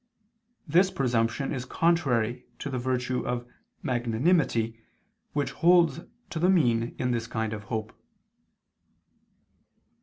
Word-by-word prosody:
This 180 +5 +4
presumption 120 -2 0
is 130 -3 -3
contrary 125 -6 +1
to 140 - -5
the 130 - -2
virtue 125 0 -1
of 120 0 -3 0.4
magnanimity 120 -1 +1 0.5
which 145 -1 -1
holds 170 -1 +4 0.3
to 160 - -3
the 180 +3 +3
mean 120 -10 +2
in 125 -1 0
this 115 -1 -1
kind 110 -1 -2
of 105 -1 -7
hope. 110 0 -4
125 Hz, 115 wpm, -27 LUFS, 115-155 Hz, 0.5 s, This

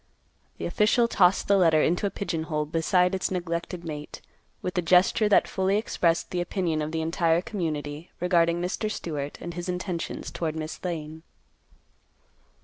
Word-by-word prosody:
The - - -4
official 235 +2 +3
tossed 185 -4 +3
the 200 - +5
letter 160 -4 +4
into 180 +5 +1
a - - -1
pigeon 180 -5 -3
hole 150 -2 -1
beside 180 +4 +2
its 190 - 0
neglected 175 -1 -3
mate, 150 -2 -7 0.4
with 180 +1 -3
a - - +2
gesture 185 +5 +4
that 205 - +5
fully 190 +1 +1
expressed 170 -6 0
the 180 - -1
opinion 175 -3 -1
of 150 +1 -3
the 160 0 -1
entire 165 0 +2
community, 155 -5 -4
regarding 170 -1 +2
Mr. 180 +5 -2
Stewart 150 -8 -4
and 175 - -6
his 175 +1 -5
intentions 180 -1 -4
toward 160 -2 -3
Miss 155 0 -6
Lane. 160 -3 -4
175 Hz, 160 wpm, -26 LUFS, 160-185 Hz, 0.4 s, the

